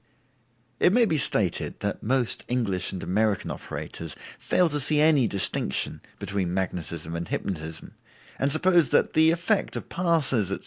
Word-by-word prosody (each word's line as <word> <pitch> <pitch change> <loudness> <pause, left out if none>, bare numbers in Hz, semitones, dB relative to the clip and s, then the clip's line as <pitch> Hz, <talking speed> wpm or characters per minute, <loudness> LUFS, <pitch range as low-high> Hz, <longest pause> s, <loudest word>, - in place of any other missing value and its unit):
It 180 - +4
may 240 0 +5
be 160 -8 +1
stated 100 -9 0
that - - -3
most 125 +1 +1
English 105 -8 0
and 95 - -6
American 105 +3 0
operators 80 -2 -6 0.2
fail 180 -1 +2
to 150 -1 -1
see 150 +2 +2
any 150 -5 +4
distinction 95 -9 -2 0.2
between 95 -3 -3
magnetism 85 -3 -3
and 85 0 -4
hypnotism, 80 -4 -5 0.5
and 140 +1 +2
suppose 170 -1 +4
that - - +2
the 160 +1 +5
effect 175 +5 0
of - - -6
passes, 150 - +1
etc. - - -2
120 Hz, 150 wpm, -25 LUFS, -, 0.5 s, may